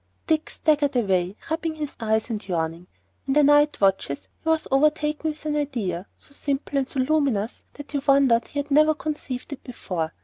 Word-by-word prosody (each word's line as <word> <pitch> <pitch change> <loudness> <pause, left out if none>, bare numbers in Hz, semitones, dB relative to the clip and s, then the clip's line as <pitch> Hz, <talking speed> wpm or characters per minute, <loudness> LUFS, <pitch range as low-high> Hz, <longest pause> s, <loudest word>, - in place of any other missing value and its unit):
Dick 315 -1 +1
staggered 290 -3 +1
away 190 -5 +1 0.2
rubbing 325 0 -1
his 300 -2 -5
eyes 220 +1 0
and 215 -2 -4
yawning. 165 -1 -2 0.4
In 270 - +1
the 295 +1 +5
night 290 +1 +5
watches 195 -8 +1
he 320 - -2
was 320 -1 +1
overtaken 300 +2 +2
with 305 0 -7
an 300 -1 0
idea, 220 -12 -2
so - - -14
simple 280 0 -2
and 265 - -2
so 270 - -1
luminous 260 -7 0
that 290 0 -10
he 285 - 0
wondered 270 -4 +4
he - - -9
had 285 0 -2
never 305 +2 +5
conceived 295 -3 -5
it 280 - -10
before. 180 -10 -4
275 Hz, 190 wpm, -24 LUFS, 220-300 Hz, 0.4 s, the